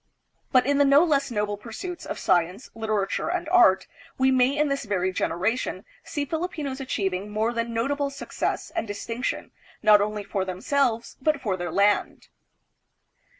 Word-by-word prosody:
But 255 -2 +5
in 285 +1 +2
the - - +7
no 280 +3 +6
less 285 -5 +1
noble 210 -3 -1
pursuits 245 - -7
of - - -4
science, 180 +6 0
literature, 215 0 -1
and 360 -1 -2
art, 340 - +5 0.3
we 265 0 +3
may 260 +2 +3
in 300 0 +3
this 275 -2 -2
very 185 -3 0
generation 185 +7 -1 0.2
see 290 -2 -3
Filipinos 310 -4 -3
achieving 195 -6 -2
more 220 +3 0
than 230 0 -2
notable 280 +5 0
success 275 - -3
and - - -1
dis 205 0 -6
tinction, 235 +2 -3 0.3
not 210 -1 +7
only 210 0 -2
for 200 -1 -2
themselves 230 +5 -1
but 305 +1 +2
for 210 -8 -1
their 175 -2 -4
land. 205 +3 +1
230 Hz, 160 wpm, -25 LUFS, 205-280 Hz, 0.3 s, the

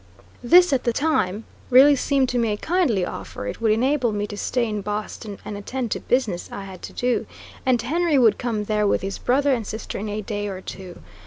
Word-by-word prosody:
This, 350 +5 +6
at 260 - +1
the 235 - +1
time, 225 -9 0 0.3
really 275 +3 +7
seemed 275 0 +1
to 245 - 0
me 230 -2 +1
a 210 - -1
kindly 290 - +1
offer; 100 - -7
it 100 - -5
would 225 -2 +3
enable 250 +2 +2
me 205 0 -2
to 205 - -7
stay 240 +3 -1
in 210 -1 -3
Boston 210 0 -5
and 210 - -5
attend 235 +3 -4
to - - -1
business 225 -9 -1
I 200 - -6
had 190 -2 -10
to - - -8
do, 245 -1 0 0.4
and 250 -2 +4
Henry 310 +6 +1
would 225 -5 +4
come 225 -4 -2
there 210 0 +1
with - - +1
his 195 +1 -4
brother 275 +2 +2
and 240 - 0
sister 220 - -5
in 210 +1 -4
a 210 +1 -3
day 205 0 -3
or 190 -2 -5
two. 185 -1 -9
225 Hz, 225 wpm, -23 LUFS, 205-260 Hz, 0.4 s, really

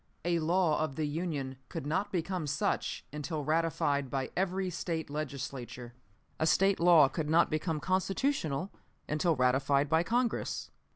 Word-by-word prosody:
A 170 -1 +2
law 165 -1 +2
of 155 -3 -1
the 155 - -1
Union 145 -4 -3
could - - -5
not 180 +7 -1
become 180 -2 -2
such 140 0 -1
until 150 +1 -3
ratified 155 -3 +1
by 135 -1 -2
every 190 0 0
State 165 -3 -3
Legislature. 130 -5 -5 0.5
A 160 - +2
State 195 +4 +3
law 170 -4 +7
could 150 +2 -3
not 165 +2 +4
become 155 0 -1
constitutional 185 - 0 0.4
until 160 +2 +1
ratified 135 +2 +2
by 160 +2 +4
Congress. 240 +6 -1
155 Hz, 140 wpm, -31 LUFS, 140-175 Hz, 0.5 s, law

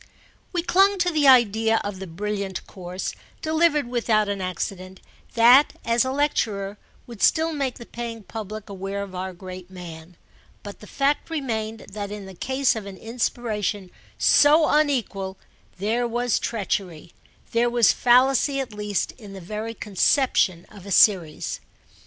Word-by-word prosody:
We 345 -2 -1
clung 390 +3 +4
to 355 -1 +1
the 300 -3 +2
idea 225 -3 +5
of 205 -2 -5
the 190 - -7
brilliant 200 +2 -4
course, 185 -1 -6 0.3
delivered 315 -3 +2
without 225 -3 +1
an 200 -1 -3
accident, 185 0 -5 0.4
that, 245 +5 +6
as 235 +2 +3
a 260 - -2
lecturer, 210 -8 -1 0.3
would 235 -4 -11
still 320 +1 +3
make 275 -4 -2
the 235 - -10
paying 230 -2 -7
public 215 0 -7
aware 195 0 -5
of 195 -2 -10
our 185 +1 -4
great 185 0 -10
man, 170 -2 -11 0.5
but 205 -1 -9
the 210 - -13
fact 280 +7 0
remained 225 -8 -3
that 205 0 -5
in 205 -1 -7
the 190 - -10
case 260 +6 0
of 215 -3 -6
an 195 -1 -9
inspiration 220 -4 -3 0.3
so 305 +2 +5
unequal 235 -11 0 0.4
there 225 +5 0
was 240 0 0
treachery, 190 -7 -3 0.4
there 235 +1 +2
was 240 -2 +4
fallacy 265 +3 +3
at 260 -5 -4
least, 210 -2 -2
in 205 -4 -11
the 195 - -8
very 215 +5 -6
conception 200 -3 +1
of 200 -2 -13
a - - -7
series. 180 -6 +3
215 Hz, 150 wpm, -24 LUFS, 195-250 Hz, 0.5 s, that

